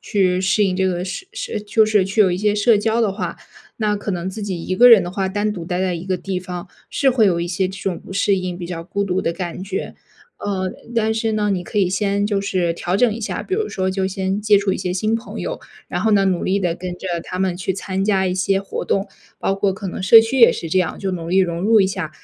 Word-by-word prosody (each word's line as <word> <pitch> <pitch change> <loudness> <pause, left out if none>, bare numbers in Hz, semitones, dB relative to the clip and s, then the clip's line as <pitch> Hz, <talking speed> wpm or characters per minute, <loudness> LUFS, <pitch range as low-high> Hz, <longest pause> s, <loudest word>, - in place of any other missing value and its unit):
去 185 -3 +1
适 195 +3 +2
应 185 -2 +1
这 190 0 +1
个， 180 -1 -1
适 195 - -6
适 - - -4
就 215 +1 +3
是 210 -3 +3
去 195 +3 0
有 190 -3 +5
一 175 - 0
些 210 +1 +1
社 210 +1 +4
交 225 +2 +1
的 220 -4 +2
话， 195 - -4 0.4
那 210 -1 +1
可 200 -1 -4
能 180 +1 -3
自 215 - -7
己 185 -5 -4
一 185 - -2
个 245 +4 +8
人 225 -6 +8
的 175 - -5
话， 190 0 -2
单 205 +2 -1
独 175 -5 -6
待 180 +2 -2
在 185 -2 0
一 170 +2 -6
个 185 -1 -1
地 190 -1 -3
方， 180 0 -7 0.2
是 270 -2 +2
会 235 -4 +3
有 170 -3 +2
一 170 - -3
些 185 +1 0
这 190 - -7
种 185 -3 -2
不 - - -11
适 200 0 +2
应、 180 -1 -3
比 175 -1 -6
较 165 -2 -6
孤 200 +2 -2
独 190 -1 0
的 165 - -1
感 180 0 -5
觉。 195 - -5 0.4
呃， 190 -2 -2 0.2
但 220 -1 +1
是 220 0 -1
呢， 210 -1 0
你 185 -3 0
可 210 - -3
以 190 - +3
先 200 +1 0
就 205 -1 0
是 185 -4 0
调 175 +2 -1
整 235 -1 +3
一 230 - -6
下， 215 - -3
比 380 - -2
如 430 0 -1
说 185 0 -2
就 190 0 -1
先 190 +1 -2
接 210 -1 +5
触 200 -1 0
一 - - -1
些 180 -1 -3
新 215 +4 0
朋 230 +1 -5
友， - - -4 0.3
然 - - -2
后 220 - +2
呢， 200 -2 +4
努 185 -2 0
力 195 +2 +1
地 175 -3 0
跟 180 0 -6
着 190 - -7 0.2
他 185 - -6
们 185 -2 0
去 190 +1 -2
参 190 +1 -3
加 195 -2 +2
一 180 - -1
些 195 +1 +1
活 195 - -5
动。 200 +1 0 0.3
包 195 - 0
括 195 0 +1
可 195 +1 -7
能 185 - -5
社 225 +4 +9
区 225 +4 -1
也 230 - +8
是 165 - -5
这 185 +3 +2
样， 175 - -2
就 190 -2 -2
努 165 -2 -5
力 185 - +2
融 175 -2 +1
入 220 0 +5
一 190 - +4
下， 185 -5 -4
195 Hz, 300 characters per minute, -20 LUFS, 185-210 Hz, 0.4 s, 社